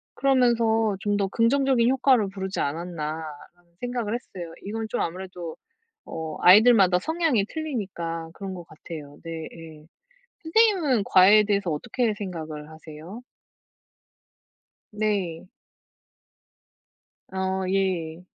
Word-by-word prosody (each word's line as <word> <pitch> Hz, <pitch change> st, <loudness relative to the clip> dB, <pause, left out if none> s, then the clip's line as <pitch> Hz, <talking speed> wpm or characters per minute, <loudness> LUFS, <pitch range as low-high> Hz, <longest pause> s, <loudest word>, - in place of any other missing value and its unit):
그러면서 230 Hz, -5 st, +2 dB
'좀 205 Hz, -1 st, 0 dB
더 200 Hz, -, +1 dB
긍정적인 245 Hz, +2 st, +2 dB
효과를 255 Hz, -6 st, +3 dB
부르지 190 Hz, 0 st, -5 dB
않았나.'라는 160 Hz, +1 st, -5 dB
생각을 245 Hz, -3 st, -3 dB
했어요. 180 Hz, -8 st, -6 dB
이건 220 Hz, +2 st, -4 dB
좀 240 Hz, -, -2 dB
아무래도 180 Hz, -1 st, -5 dB, 0.5 s
어 160 Hz, -1 st, -6 dB
아이들마다 195 Hz, -2 st, +7 dB
성향이 315 Hz, -, +1 dB
틀리니까 190 Hz, -, -4 dB
그런 195 Hz, -2 st, -6 dB
것 175 Hz, -2 st, -9 dB
같아요. 150 Hz, -2 st, -10 dB
네 165 Hz, -1 st, -6 dB
예. 160 Hz, -2 st, -12 dB, 0.6 s
선생님은 320 Hz, -, +3 dB
과외에 195 Hz, +4 st, +7 dB
대해서 200 Hz, -4 st, 0 dB
어떻게 220 Hz, +9 st, -1 dB
생각을 160 Hz, -7 st, -6 dB
하세요? 160 Hz, +8 st, -11 dB, 1.7 s
네. 205 Hz, -6 st, -2 dB, 1.8 s
아 190 Hz, 0 st, -1 dB
예. 180 Hz, -3 st, -1 dB
190 Hz, 250 characters per minute, -25 LUFS, 165-230 Hz, 1.8 s, 아이들마다